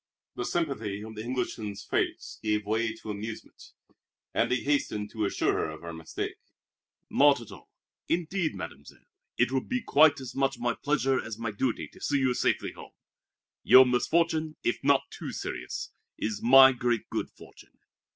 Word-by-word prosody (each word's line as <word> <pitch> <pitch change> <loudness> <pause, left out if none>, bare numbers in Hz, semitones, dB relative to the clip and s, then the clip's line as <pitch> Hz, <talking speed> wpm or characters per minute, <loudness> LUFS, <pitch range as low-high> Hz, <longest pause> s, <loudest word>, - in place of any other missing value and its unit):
The 120 - -4
sympathy 115 -12 -2
of 110 0 -8
the 110 - -6
Englishman's 110 -5 -4
face - - -2
gave 105 -1 0
way 110 +2 0
to 110 -1 -7
amusement, 105 +2 -8 0.6
and 115 - +1
he 125 - +1
hastened 105 -8 -1
to 110 -2 -1
assure 100 - +1
her - - -1
of 80 0 -9
her 85 -1 -6
mistake. 80 -1 -5 0.7
"Not 145 -1 +5
at 115 - -11
all, - - -13 0.4
indeed, 170 0 0
Mademoiselle. - - -9 0.3
It - - +2
will 130 -1 +1
be 250 - -3
quite 150 -6 +5
as 130 -2 -7
much 135 -1 0
my 120 0 0
pleasure 135 -2 0
as 110 -2 -6
my 115 -1 -3
duty 115 +4 -2
to - - -18
see 145 - +1
you 130 -2 +2
safely - - 0
home. - - -13 0.7
Your 130 0 +8
misfortune 155 +5 +1
if 120 - -1
not 140 0 +4
too - - -6
serious - - -5 0.3
is 105 -1 -3
my 135 +2 +8
great 120 -2 -1
good - - -2
fortune!" - - -17
125 Hz, 170 wpm, -28 LUFS, 110-140 Hz, 0.7 s, Your